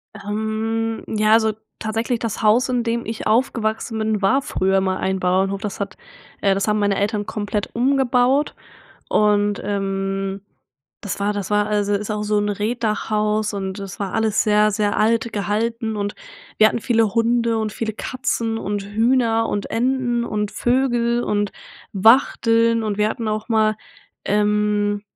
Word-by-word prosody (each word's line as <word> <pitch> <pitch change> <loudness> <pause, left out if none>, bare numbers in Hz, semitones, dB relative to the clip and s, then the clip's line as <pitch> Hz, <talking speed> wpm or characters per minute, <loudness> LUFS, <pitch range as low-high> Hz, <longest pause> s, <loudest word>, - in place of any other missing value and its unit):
Ähm, 220 +2 -2
ja, 215 0 +2
also 220 -1 +4 0.3
tatsächlich, 225 +2 -1
das 225 -2 -3
Haus, 225 +4 +3
in 245 -2 0
dem 235 0 -2
ich 225 +1 -4
aufgewachsen 225 -1 0
bin, 220 -1 -1
war 235 +8 +3
früher 190 -6 +1
mal 190 0 0
ein 190 0 -1
Bauernhof, 190 +2 +1
das 210 -3 -5
hat 195 -2 -4 0.4
äh, 195 -1 +3
das 195 +1 -1
haben 210 0 +2
meine 205 -1 +1
Eltern 205 +1 -1
komplett 205 -1 -3
umgebaut 260 +2 +2 0.5
und, 205 -1 +2
ähm, 195 -1 -2 0.6
das 200 - -4
war 205 +1 +1
das 205 -2 -4
war 210 0 +2
also 205 -1 +1
ist 205 +1 -3
auch 210 0 -2
so 210 0 +1
'n 205 0 0
Reetdachhaus 215 0 -1
und 190 0 -4
es 195 -2 -7
war 195 -2 -3
alles 220 -1 +1
sehr, 210 0 +4
sehr 205 0 0
alt 230 +2 +1
gehalten 220 +2 -1
und 205 0 -3 0.4
wir 215 - +7
hatten 235 - -2
viele 225 -2 +2
Hunde 230 0 +2
und 215 -1 -2
viele 220 0 -3
Katzen 230 -1 -2
und 205 -1 -3
Hühner 225 +2 +1
und 205 - -2
Enten 245 0 0
und 210 -2 -2
Vögel 240 -1 +1
und 205 -1 0 0.4
Wachteln 230 +1 +4
und 210 -1 -2
wir 210 0 +3
hatten 230 - -4
auch 215 +1 -3
mal, 215 -2 +2 0.5
ähm 210 0 +1
215 Hz, 160 wpm, -21 LUFS, 205-230 Hz, 0.6 s, wir